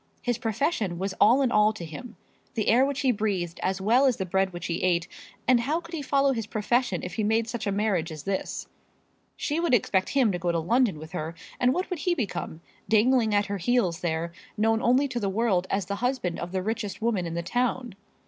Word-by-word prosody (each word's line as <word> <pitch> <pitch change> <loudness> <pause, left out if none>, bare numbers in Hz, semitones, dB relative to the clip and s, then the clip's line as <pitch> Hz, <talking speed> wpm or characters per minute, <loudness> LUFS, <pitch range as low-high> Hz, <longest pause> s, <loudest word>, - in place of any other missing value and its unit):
His 245 -2 -1
profession 225 - -1
was 190 +2 -2
all 250 +6 +6
in 250 - +1
all 210 0 +4
to 180 -6 -7
him, 215 +10 -9 0.4
the 215 - 0
air 245 +4 +5
which 280 0 -1
he 265 -3 +3
breathed 200 -6 -2
as 190 0 -1
well 240 +8 +4
as 255 - +2
the 190 - -2
bread 190 +1 +1
which 175 -1 -7
he 170 0 -2
ate; 175 -1 +1 0.4
and 250 -1 +5
how 290 +8 0
could 340 0 -13
he 320 - -3
follow 275 0 +2
his 225 -3 -3
profession 215 -2 0
if 180 - -5
he 220 - -1
made 220 +2 +1
such 230 -2 -4
a - - +1
marriage 195 -5 0
as 155 -2 -8
this? 195 -1 -3 0.7
She 300 +2 -1
would 335 -7 +3
expect 190 -4 +1
him 260 -6 +3
to 175 - -3
go 175 0 0
to 170 - 0
London 215 +3 +2
with 155 +2 -10
her; 165 -2 -4 0.2
and 250 0 +4
what 365 +7 -1
would 360 - -2
he 350 +4 +1
become, 200 - -4 0.3
dangling 220 0 +4
at 205 0 +3
her 200 -1 -4
heels 185 -4 +1
there, 170 0 -2 0.3
known 225 +1 +2
only 255 +4 +3
to 240 -3 -3
the 200 -3 -1
world 195 -3 +1
as 195 -2 0
the 200 +2 -3
husband 245 -6 -1
of 175 +1 -5
the 185 -1 -2
richest 215 -1 -3
woman 215 -6 0
in 165 - -5
the 170 - -2
town? 245 +4 -1
215 Hz, 235 wpm, -26 LUFS, 185-245 Hz, 0.7 s, all